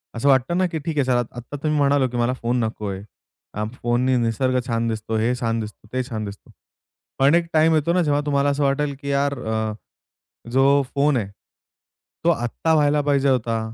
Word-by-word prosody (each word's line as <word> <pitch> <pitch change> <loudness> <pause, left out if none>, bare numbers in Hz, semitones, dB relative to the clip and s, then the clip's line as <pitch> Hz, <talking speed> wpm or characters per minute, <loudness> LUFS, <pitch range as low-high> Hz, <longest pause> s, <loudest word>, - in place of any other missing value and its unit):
असं 115 +5 -1
वाटतं 135 +5 +3
ना 185 - +3
की 165 -2 -4
ठीक 160 -2 -3
आहे 140 - +2
सर, 130 - +2 0.2
आता 120 +4 -8
तुम्ही 150 +1 -1
म्हणालात 140 -2 +3
की 125 - -3
मला 120 +1 +1
फोन 120 +2 0
नकोय. 105 -3 -4 0.7
फोननी 125 +1 0
निसर्ग 125 +2 +1
छान 115 -1 0
दिसतो, 110 0 -3
हे 115 +3 +1
छान 115 -2 -1
दिसतो, 105 0 -8
ते 130 - 0
छान 110 -2 -4
दिसतो. 100 0 -10 0.7
पण 140 +4 +5
एक 170 0 +1
टाइम 160 +1 +4
येतो 155 +2 +1
ना, 180 - +3
जेव्हा 145 -2 +1
तुम्हाला 140 -1 +2
असं 140 +1 0
वाटेल 140 +1 0
की 140 - -5
यार, 140 0 +1
अ, 110 -2 -2 0.8
जो 135 +2 +4
फोन 140 0 +3
आहे, 105 -4 -2 1.0
तो 170 - +3
आत्ता 160 +2 0
व्हायला 150 -1 +3
पाहिजे 140 -1 +2
होता, 115 -3 +1
135 Hz, 190 wpm, -22 LUFS, 115-145 Hz, 1.0 s, पण